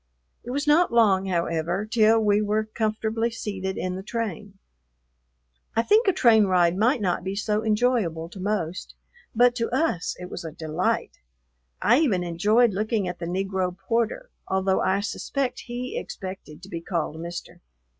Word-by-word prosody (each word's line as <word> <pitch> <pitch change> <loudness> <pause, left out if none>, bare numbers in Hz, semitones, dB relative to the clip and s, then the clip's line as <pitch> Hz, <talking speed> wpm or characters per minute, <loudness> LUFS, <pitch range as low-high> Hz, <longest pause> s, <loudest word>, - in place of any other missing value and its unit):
It 240 - -9
was 285 +4 -1
not 310 +4 +4
long, 200 -5 +4
however, 170 +1 -1
till 225 0 +4
we 210 -1 +3
were 215 +1 +1
comfortably 220 +1 -1
seated 195 -4 -4
in 185 0 -2
the 190 - -5
train. 205 -2 -5 1.2
I 230 - +3
think 425 - +4
a - - +6
train 225 - +5
ride 180 -2 +3
might 230 +5 +2
not 180 -3 0
be 190 +1 -3
so 210 +1 -1
enjoyable 210 -7 +1
to 190 - -11
most, 185 -3 -3 0.4
but 245 +1 +5
to 230 - -1
us 255 - 0
it 180 - -6
was 180 - -7
a 160 - -6
delight; 160 +3 -2 0.6
I 240 +6 +5
even 210 - +2
enjoyed 210 +7 +3
looking 215 0 -1
at 180 0 -5
the 170 - -4
Negro 190 0 -2
porter, 235 - -2 0.2
although 190 0 +1
I 195 +1 +1
suspect 260 +5 -3
he 245 +1 -5
expected 185 -4 -7
to 190 - -10
be 170 -4 -5
called 165 -2 -3
Mister. 170 +1 -7
205 Hz, 165 wpm, -25 LUFS, 180-230 Hz, 1.2 s, a